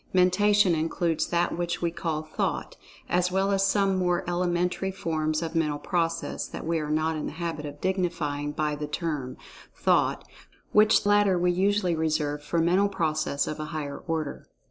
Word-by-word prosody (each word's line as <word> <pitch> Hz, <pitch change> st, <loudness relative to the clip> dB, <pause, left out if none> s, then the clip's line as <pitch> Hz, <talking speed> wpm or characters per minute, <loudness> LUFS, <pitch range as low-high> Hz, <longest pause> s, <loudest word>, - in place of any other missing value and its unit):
Mentation 190 Hz, +1 st, +4 dB
includes 165 Hz, +1 st, 0 dB
that 175 Hz, 0 st, 0 dB
which 175 Hz, 0 st, -2 dB
we 170 Hz, -1 st, 0 dB
call 160 Hz, -2 st, -3 dB
"Thought," 155 Hz, -, -3 dB, 0.3 s
as 180 Hz, 0 st, +1 dB
well 195 Hz, +1 st, +1 dB
as 195 Hz, 0 st, +3 dB
some 195 Hz, -1 st, +2 dB
more 180 Hz, -1 st, 0 dB
elementary 180 Hz, +1 st, 0 dB
forms 160 Hz, -4 st, -1 dB
of 165 Hz, -, -4 dB
mental 155 Hz, -3 st, +1 dB
process 165 Hz, +1 st, -2 dB
that -, -, -7 dB
we 165 Hz, 0 st, 0 dB
are 150 Hz, -1 st, -4 dB
not 155 Hz, +1 st, +1 dB
in 155 Hz, -, -3 dB
the -, -, -6 dB
habit 160 Hz, -2 st, -4 dB
of 145 Hz, 0 st, -9 dB
dignifying 170 Hz, -6 st, -1 dB
by 150 Hz, 0 st, -1 dB
the 150 Hz, 0 st, -4 dB
term, 150 Hz, -5 st, -3 dB, 0.4 s
Thought, -, -, +1 dB, 0.4 s
which 210 Hz, 0 st, +5 dB
latter 205 Hz, -2 st, +4 dB
we 180 Hz, 0 st, +2 dB
usually 190 Hz, 0 st, +1 dB
reserve 155 Hz, -2 st, -1 dB
for 160 Hz, +3 st, -3 dB
mental 180 Hz, +5 st, +3 dB
process 155 Hz, -6 st, 0 dB
of 155 Hz, -, -5 dB
a 155 Hz, -, -3 dB
higher 150 Hz, -3 st, -5 dB
order. 160 Hz, -3 st, -3 dB
170 Hz, 170 wpm, -27 LUFS, 155-180 Hz, 0.4 s, which